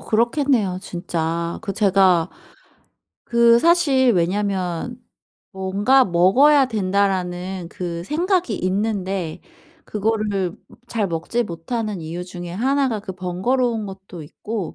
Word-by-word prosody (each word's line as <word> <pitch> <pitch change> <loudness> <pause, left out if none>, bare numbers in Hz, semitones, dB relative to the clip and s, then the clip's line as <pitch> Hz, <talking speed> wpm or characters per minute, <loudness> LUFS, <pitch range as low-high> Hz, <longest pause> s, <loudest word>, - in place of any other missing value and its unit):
그렇겠네요 235 -4 +1
진짜. 170 -1 -3
그 200 -3 -3
제가 190 -4 +3 1.0
그 235 0 +5
사실 280 -5 +4
왜냐면 190 +4 -1 0.5
'뭔가 205 +7 +2
먹어야 250 +12 +5
된다.'라는 185 -3 -1
그 170 -1 -5
생각이 345 - 0
있는데 190 -3 -2 0.4
그거를 210 -4 -1 0.3
잘 220 -4 -1
먹지 175 +8 -1
못하는 210 +3 -4
이유 165 +3 -5
중에 175 -1 -8
1 265 +8 +1
가 220 -4 -2
그 195 -2 -7
번거로운 215 +6 -1
것도 190 -3 -9
있고 200 +5 -6
195 Hz, 225 characters per minute, -21 LUFS, 180-235 Hz, 1.0 s, 그